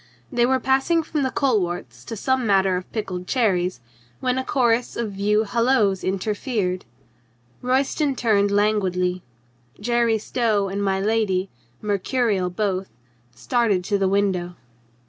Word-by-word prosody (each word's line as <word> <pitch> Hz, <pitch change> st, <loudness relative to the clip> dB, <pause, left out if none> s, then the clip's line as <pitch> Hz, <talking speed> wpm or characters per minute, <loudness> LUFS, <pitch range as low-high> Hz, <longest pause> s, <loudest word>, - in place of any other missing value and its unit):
They 240 Hz, -2 st, +2 dB
were 260 Hz, 0 st, +2 dB
passing 270 Hz, +6 st, +2 dB
from 300 Hz, -1 st, -2 dB
the 265 Hz, -, +1 dB
coleworts 175 Hz, -, -1 dB
to -, -, -5 dB
some 260 Hz, +4 st, 0 dB
matter 195 Hz, -2 st, +3 dB
of 180 Hz, 0 st, -5 dB
pickled 185 Hz, -5 st, -4 dB
cherries 185 Hz, -, +1 dB, 0.4 s
when 255 Hz, 0 st, 0 dB
a -, -, -2 dB
chorus 240 Hz, -3 st, +1 dB
of 230 Hz, -3 st, -2 dB
view 210 Hz, +2 st, +1 dB
hallos 220 Hz, -3 st, +2 dB
inter 195 Hz, +3 st, -1 dB
fered. 205 Hz, -6 st, -2 dB, 0.8 s
Royston 270 Hz, +3 st, +1 dB
turned 210 Hz, -5 st, +2 dB
languidly. 190 Hz, -3 st, +1 dB, 0.6 s
Jerry 235 Hz, +1 st, +2 dB
Stow 215 Hz, -3 st, 0 dB
and 200 Hz, +1 st, -2 dB
my 190 Hz, -1 st, +1 dB
lady, 200 Hz, -3 st, 0 dB, 0.3 s
mercurial 205 Hz, -1 st, 0 dB
both, 190 Hz, 0 st, -2 dB, 0.5 s
started 210 Hz, -, +1 dB
to 200 Hz, +1 st, 0 dB
the 195 Hz, -, +2 dB
window. 190 Hz, -3 st, 0 dB
210 Hz, 135 wpm, -23 LUFS, 190-240 Hz, 0.8 s, matter